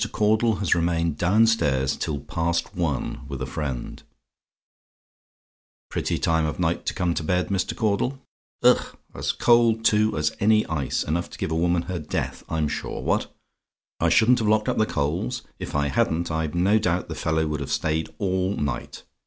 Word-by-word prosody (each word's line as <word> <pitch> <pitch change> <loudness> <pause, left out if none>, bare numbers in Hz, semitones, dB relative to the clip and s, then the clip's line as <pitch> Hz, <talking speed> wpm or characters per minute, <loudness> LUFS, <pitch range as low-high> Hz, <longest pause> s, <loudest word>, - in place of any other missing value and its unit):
CAUDLE 110 +1 +2
HAS 100 -2 +1
REMAINED 85 -2 0
DOWNSTAIRS 90 - +3
TILL 70 -3 -3
PAST 85 +3 -2
ONE, 80 -7 -2
WITH 70 -2 -5
A 65 - -2
FRIEND 65 -3 -5 1.9
"Pretty - - -1
time 80 -1 +1
of 75 +2 -4
night 85 -1 -1
to - - -1
come 90 -2 0
to - - -2
bed, 90 +3 0
Mr. 95 -2 -1
Caudle. 110 +4 0 0.5
Ugh! - - +3 0.2
As - - -1
cold, 115 -2 +3
too, 110 -2 +3
as 75 0 0
any 110 +1 +4
ice. 75 -5 -1
Enough 85 +3 -2
to - - -11
give - - -3
any 80 +1 0
woman 85 0 +2
her 90 0 -4
death, 75 - -3
I'm 80 -2 0
sure. - - -4
What! - - 0 0.7
"I - - +3
SHOULDN'T 120 +3 +5
HAVE 110 - 0
LOCKED 105 0 +2
UP - - -1
THE 110 - +4
COALS? 90 - -2 0.2
"If - - -6
I 70 0 +1
hadn't, 80 +5 0
I've 80 0 -2
no 100 +5 +3
doubt 90 -3 0
the - - -5
fellow 80 0 0
would 75 -1 -2
have 70 - -5
stayed 80 0 0
all 95 +1 0
night. 70 -2 -4
85 Hz, 180 wpm, -24 LUFS, 75-105 Hz, 1.9 s, SHOULDN'T